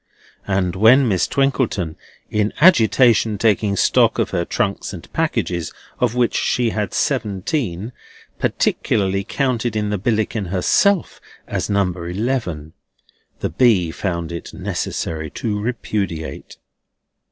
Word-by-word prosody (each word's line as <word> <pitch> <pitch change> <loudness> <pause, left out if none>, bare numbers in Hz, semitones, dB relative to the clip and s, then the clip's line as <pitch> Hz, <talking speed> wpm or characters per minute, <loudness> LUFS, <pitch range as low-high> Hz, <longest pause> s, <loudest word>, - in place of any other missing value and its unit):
And 95 -2 0
when 120 +7 +6
Miss 95 -5 +1
Twinkleton, 130 - 0 0.4
in 105 0 0
agitation 115 - +5
taking 105 -1 +2
stock - - +3
of - - 0
her 85 - -1
trunks 100 +2 -2
and 85 - -11
packages, 90 - -1 0.3
of 120 -1 +1
which 125 -1 +2
she 120 -2 +1
had 105 -4 -3
seventeen, 105 - -1 0.5
particularly 100 -1 0
counted 120 -1 -1
in 105 -1 -1
the 105 - -1
Billickin 110 -1 -1
herself 160 - +1 0.2
as - - -3
number 90 -4 -1
eleven, 90 - -3 0.7
the - - -1
B. 100 -10 +3
found 85 -2 -3
it 85 - -7
necessary 80 -1 -3
to 105 -3 -3
repudiate. 105 -8 -4
105 Hz, 120 wpm, -20 LUFS, 90-120 Hz, 0.7 s, when